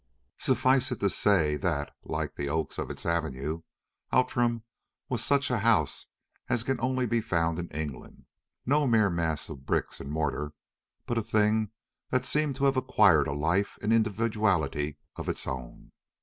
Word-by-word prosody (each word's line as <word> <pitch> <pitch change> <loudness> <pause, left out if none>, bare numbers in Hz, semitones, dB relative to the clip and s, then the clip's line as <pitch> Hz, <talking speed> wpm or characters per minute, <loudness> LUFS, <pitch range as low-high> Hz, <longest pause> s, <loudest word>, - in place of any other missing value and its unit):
Suffice 130 0 +3
it 125 - -3
to 100 -1 +3
say 80 -8 +3
that, 70 0 -2
like - - -3
the 70 0 -3
oaks 80 +1 -2
of - - -3
its - - -5
avenue, 80 -2 -1 0.5
Outram 120 -2 +2 0.5
was 120 -3 -1
such 140 -2 +2
a 120 - +1
house 105 -10 +2 0.4
as 120 -2 +1
can 130 -1 -1
only 130 0 +1
be 115 0 +1
found 85 -5 0
in 85 - -4
England; 75 -5 -7 0.4
no 145 +2 +3
mere 110 -5 +4
mass 80 -3 -1
of 70 -4 -9
bricks - - -1
and 70 - -7
mortar, 75 -1 -2 0.5
but 120 -1 0
a - - 0
thing 110 0 +2 0.4
that 130 0 +1
seemed 150 -1 +2
to 140 +1 0
have 135 -1 +3
acquired 105 - +4
a - - -2
life 85 +8 0
and 105 +2 +1
individuality 105 -10 +1 0.2
of - - -4
its - - -2
own. 65 -2 -7
105 Hz, 165 wpm, -28 LUFS, 80-120 Hz, 0.5 s, mere